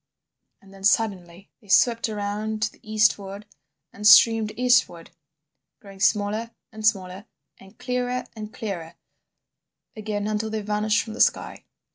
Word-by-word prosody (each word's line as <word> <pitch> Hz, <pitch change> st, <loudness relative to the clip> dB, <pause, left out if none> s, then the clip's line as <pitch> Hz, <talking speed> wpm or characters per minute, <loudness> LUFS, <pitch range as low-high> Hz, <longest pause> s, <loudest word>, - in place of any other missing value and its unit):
And 195 Hz, 0 st, -18 dB
then 195 Hz, 0 st, -14 dB
suddenly 195 Hz, -3 st, -1 dB
they 210 Hz, -, -22 dB
swept 230 Hz, +4 st, +3 dB
round 215 Hz, +1 st, -4 dB
to 215 Hz, -, -1 dB
the -, -, -23 dB
eastward 210 Hz, -2 st, 0 dB, 0.5 s
and 210 Hz, +1 st, -1 dB
streamed 220 Hz, +1 st, +6 dB
eastward, 245 Hz, -10 st, +1 dB, 0.7 s
growing 200 Hz, -4 st, -14 dB
smaller 210 Hz, +2 st, 0 dB, 0.2 s
and 220 Hz, -1 st, -10 dB
smaller 195 Hz, -2 st, 0 dB, 0.3 s
and 195 Hz, +2 st, -18 dB
clearer 250 Hz, 0 st, -2 dB
and 215 Hz, -1 st, -8 dB
clearer 175 Hz, -9 st, -6 dB, 1.0 s
again 210 Hz, -1 st, -4 dB
until 215 Hz, +1 st, -2 dB
they 220 Hz, 0 st, -3 dB
vanished 210 Hz, +1 st, 0 dB
from 220 Hz, -, -9 dB
the -, -, -3 dB
sky. -, -, 0 dB
210 Hz, 135 wpm, -24 LUFS, 200-220 Hz, 1.0 s, streamed